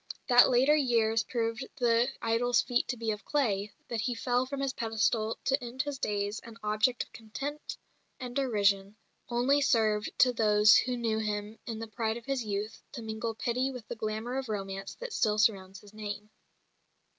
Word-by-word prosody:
That 245 Hz, 0 st, +8 dB
later 260 Hz, +4 st, +5 dB
years 230 Hz, -6 st, +2 dB
proved 230 Hz, +2 st, -2 dB
the 235 Hz, 0 st, +3 dB, 0.2 s
idol's 235 Hz, +2 st, +2 dB
feet 245 Hz, -1 st, +1 dB
to 250 Hz, -, -3 dB
be 225 Hz, -1 st, -1 dB
of 210 Hz, 0 st, -5 dB
clay, 210 Hz, -8 st, 0 dB, 0.2 s
that 230 Hz, -2 st, -2 dB
he 245 Hz, +2 st, -1 dB
fell 245 Hz, +2 st, 0 dB
from 280 Hz, +1 st, -4 dB
his 270 Hz, -1 st, -1 dB
pedestal 225 Hz, -1 st, 0 dB
to 270 Hz, -1 st, +1 dB
end 245 Hz, +3 st, -3 dB
his 290 Hz, -2 st, -5 dB
days 205 Hz, -2 st, -1 dB
an 230 Hz, -1 st, -12 dB
object 215 Hz, +4 st, +1 dB
of -, -, -22 dB
contempt 275 Hz, +7 st, -6 dB, 0.4 s
and 245 Hz, -1 st, -6 dB
derision, 205 Hz, -6 st, +1 dB, 0.3 s
only 255 Hz, +4 st, +2 dB
served 220 Hz, -5 st, +2 dB
to 250 Hz, -1 st, +5 dB
those 210 Hz, -1 st, +5 dB
who 250 Hz, 0 st, +2 dB
knew 225 Hz, -2 st, 0 dB
him 210 Hz, 0 st, -3 dB
in 225 Hz, -2 st, -4 dB
the 225 Hz, -, -5 dB
pride 220 Hz, 0 st, -2 dB
of 235 Hz, -, -11 dB
his 270 Hz, -3 st, -1 dB
youth 210 Hz, 0 st, -4 dB
to 240 Hz, -5 st, -6 dB
mingle 220 Hz, +1 st, -3 dB
pity 250 Hz, +4 st, 0 dB
with 250 Hz, -5 st, -8 dB
the -, -, -4 dB
glamour 220 Hz, +4 st, -3 dB
of 260 Hz, -3 st, -6 dB
romance 195 Hz, -2 st, -4 dB
that -, -, -7 dB
still 210 Hz, -1 st, +1 dB
surrounds 195 Hz, -3 st, +1 dB
his 205 Hz, 0 st, -16 dB
name. 210 Hz, 0 st, -6 dB
225 Hz, 185 wpm, -30 LUFS, 215-250 Hz, 0.4 s, That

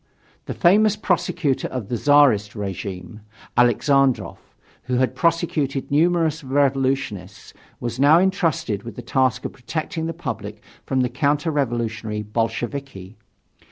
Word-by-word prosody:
The -, -, -4 dB
famous 210 Hz, +4 st, +4 dB
prosecutor 180 Hz, -8 st, 0 dB
of 125 Hz, -6 st, -6 dB
the 120 Hz, -, -1 dB
Czarist 135 Hz, -7 st, +4 dB
regime, 95 Hz, -1 st, -6 dB, 0.3 s
Aleksandrov, 130 Hz, +2 st, +2 dB, 0.5 s
who 125 Hz, 0 st, -1 dB
had 130 Hz, +1 st, +1 dB
prosecuted 155 Hz, -5 st, -1 dB
numerous 160 Hz, 0 st, +2 dB
revolutionists, 135 Hz, -6 st, -1 dB, 0.3 s
was 120 Hz, +1 st, -4 dB
now 145 Hz, +4 st, +6 dB
entrusted 165 Hz, -, 0 dB
with 115 Hz, -2 st, -9 dB
the 125 Hz, -, -8 dB
task 130 Hz, +2 st, 0 dB
of -, -, -4 dB
protecting 160 Hz, +5 st, -4 dB
the 165 Hz, -, -3 dB
public 105 Hz, -10 st, -6 dB, 0.2 s
from 130 Hz, -1 st, +1 dB
the 125 Hz, -, 0 dB
counter 145 Hz, +3 st, 0 dB
revolutionary 115 Hz, -6 st, -2 dB
Bolsheviki. 115 Hz, -1 st, -4 dB
135 Hz, 125 wpm, -22 LUFS, 115-155 Hz, 0.5 s, now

